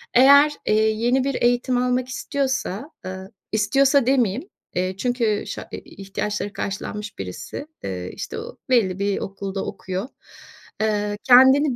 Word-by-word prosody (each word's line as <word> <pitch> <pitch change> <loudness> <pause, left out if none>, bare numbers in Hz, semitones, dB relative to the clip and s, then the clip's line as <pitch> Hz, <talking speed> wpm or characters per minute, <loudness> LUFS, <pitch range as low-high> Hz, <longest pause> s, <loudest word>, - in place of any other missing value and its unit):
Eğer, 280 +4 +7 0.2
eee, 215 - +3
yeni 240 +4 +1
bir 275 0 -1
eğitim 245 +1 +2
almak 250 0 +1
istiyorsa, 265 - -2
ııı, 190 +1 -7 0.2
istiyorsa 270 +6 +3
demeyeyim, 255 - +1 0.3
eee, 185 +1 -1
çünkü 230 -2 0
şa - - -6
e - - -5
e - - -6
ihtiyaçları 200 +1 -4
karşılanmış 205 +1 -5
birisi, 95 - -6 0.2
eee, 90 -1 -4
işte, - - -6
o - - -9
belli 200 -7 +2
bir 200 0 0
okulda 195 0 -4
okuyor, 190 +4 -4 0.7
eee, 210 -1 0
kendini 265 +2 +6
220 Hz, 140 wpm, -23 LUFS, 195-260 Hz, 0.7 s, Eğer